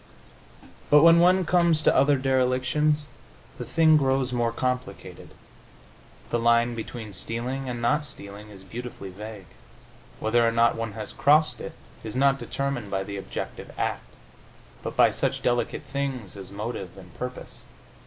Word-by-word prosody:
But 150 +1 +7
when 170 0 +8
one 180 +1 +4
comes 170 -2 +3
to - - +4
other 140 0 +4
derelictions 130 +3 +1 0.5
the - - -4
thing 160 -1 +4
grows 135 -2 +1
more 120 -1 +1
complicated. 125 +1 -4 1.0
The 120 - +1
line 120 +1 +3
between 110 -2 -7
stealing 125 +5 -3
and 120 -1 -4
not 150 +6 +2
stealing 105 -5 -9
is 95 -2 -12
beautifully 115 -2 -8
vague; 105 0 -9 0.7
whether 115 +2 +2
or 115 - +3
not 115 0 +3
one 115 -2 -4
has 110 -2 -6
crossed 155 +2 +3
it - - -7 0.3
is 110 0 -6
not 135 +1 +3
determined 135 -6 -3
by 95 -1 -1
the 100 0 -6
objective 95 - -6
act, - - -3 0.7
but - - -5
by - - +6
such - - -2
delicate 120 -1 0
things 135 -7 -4
as 95 -2 -8
motive 100 -2 -6
and 90 -3 -13
purpose. 125 0 -7
120 Hz, 150 wpm, -26 LUFS, 110-140 Hz, 1.0 s, when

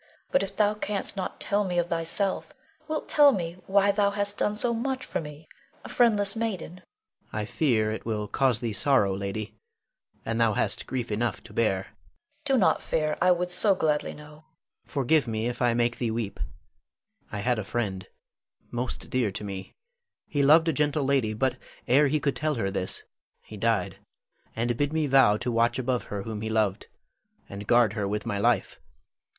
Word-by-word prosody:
But 275 - +3
if 195 0 -4
thou 210 0 +3
canst 210 -1 -2
not 190 -2 -4
tell 205 0 +1
me 180 -3 -2
of 175 0 +1
thyself, 170 - -1 0.3
wilt 310 -1 -3
tell 290 -1 +6
me 170 -6 -3
why 200 +1 +4
thou 200 0 +2
hast 205 0 -2
done 210 - +1
so 235 +2 0
much 260 +3 -2
for - - -3
me, 150 0 -10 0.4
a - - -7
friendless 210 -4 +2
maiden? 220 -8 -3
Adrian. - - -17 0.5
I 105 0 -2
fear 115 -3 +1
it 110 - -5
will 105 -2 -2
cause 130 0 +1
thee 115 -3 -2
sorrow, 105 -6 +3
lady; 100 +2 -4 0.7
and 115 +1 -1
thou 115 -2 +4
hast - - -1
grief 120 -3 -3
enough 110 +1 -1
to 110 - -13
bear. 110 -2 +2
Leonore. 95 - -6 0.6
Do 270 -2 +3
not 200 - +3
fear. 155 -1 0
I 180 - +5
would 180 0 0
so 195 +2 +3
gladly 150 -4 0
know 150 - -11
Adrian. 150 +1 -16 0.4
Forgive 140 0 +2
me 110 0 -2
if 120 +1 -3
I 120 -1 +3
make 120 0 +1
thee 120 - 0
weep: 110 -2 -3 0.9
I 105 - -4
had 120 +1 +1
a - - -3
friend, 95 -4 -3 0.6
most 120 +1 -3
dear 125 -5 +1
to 100 - -6
me. 95 -2 -6 0.6
He 145 - 0
loved 155 +4 +6
a 165 - +2
gentle 150 +1 +1
lady, 130 -6 +1
but 130 +3 0 0.3
ere 140 +4 +5
he 150 +2 +1
could 140 -2 0
tell 155 0 -1
her 95 -5 -1
this, 95 -1 -2 0.4
he 110 - -11
died, 110 -2 0 0.6
and 120 +1 0
bid 145 +2 0
me 160 -1 +1
vow 135 -7 +5
to 125 - -2
watch 115 +1 +2
above 125 -1 -1
her 100 -1 -5
whom 110 -1 -5
he 110 - -3
loved, 110 -3 0 0.6
and 100 0 -8
guard 120 -4 +4
her 105 -3 -2
with 105 +1 -3
my 100 - -2
life. - - +1
130 Hz, 195 wpm, -27 LUFS, 110-175 Hz, 0.9 s, tell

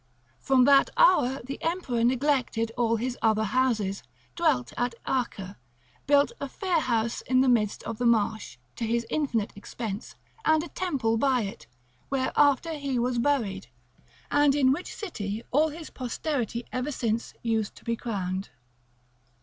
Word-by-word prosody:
From 265 -1 +4
that 275 0 +6
hour 275 - +4
the 270 +3 -6
emperor 325 -9 -1
neglected 250 -3 +1
all 235 -2 +2
his 245 +2 -3
other 220 -1 +3
houses, 215 -4 0 0.3
dwelt 300 -8 +1
at 245 -1 -1
Ache, 205 -7 -2 0.5
built 285 +4 +4
a 280 - -3
fair 360 +2 0
house 230 -5 0
in 255 0 +2
the 265 - +3
midst 220 -5 +2
of 225 -1 -5
the 245 - +2
marsh, 220 - +1 0.2
to 235 - -2
his 235 +1 0
infinite 245 -9 0
expense, 205 +1 -6 0.3
and 315 0 +3
a 345 - -8
temple 265 -11 -1
by 260 0 +2
it, 195 - -6 0.4
where 265 -1 -1
after 290 +3 +3
he 280 -4 -2
was 240 0 0
buried, 235 - 0 0.6
and 290 -1 +4
in 265 -3 +4
which 330 +7 -2
city 220 - -5
all 305 +4 +3
his 315 +1 -9
posterity 245 -2 -3
ever 255 +4 -2
since 230 -3 -2
use 225 -3 0
to - - -18
be 230 - -1
crowned. 195 -4 -3
245 Hz, 155 wpm, -27 LUFS, 225-280 Hz, 0.6 s, that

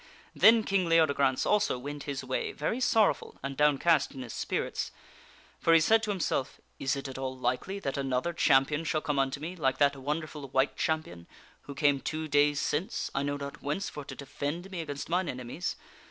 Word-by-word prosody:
Then 225 0 +6
King 190 -4 +1
Leodegrance 140 -5 +3
also 210 -10 +2
went 145 +3 -6
his 140 -2 -4
way, 130 0 -2
very 185 - -2
KingLeode. - - 0
sorrowful 225 -4 +2
and 135 0 -4
downcast 150 +1 +3
in 130 - -5
his 120 - -8
spirits^ - - -2 0.7
For 165 - +4
he - - +8
said 220 +8 +4
to 220 - -4
himself: 170 -9 -1
granceis - - -35
" - - -40
Is 135 - +2
'it 140 0 -5
at 130 - -7
all 130 -1 -4
likely 130 +10 -1
that 140 -9 -3
another 135 +5 -1
champion 145 -1 +3
shall 155 -1 0
come 145 -2 -1
unto 135 0 0
me 165 +5 -5
like 135 -6 0
that 140 -1 +3
wonderful 150 +1 -4
White 135 +2 +1
Champion 120 - -2 0.4
who 140 - -8
came 140 -1 +3
two 155 +3 -3
days 145 0 +3
since, 155 +6 -2
I 135 - 0
know 145 0 -1
not 140 0 -7
whence, 150 +8 -2
for 150 - -7
to - - -8
defend 150 +6 -5
me 180 -3 -3
against 145 -3 -5
mine 180 +1 0
enemies? 125 +7 -4
145 Hz, 205 wpm, -29 LUFS, 135-165 Hz, 0.7 s, he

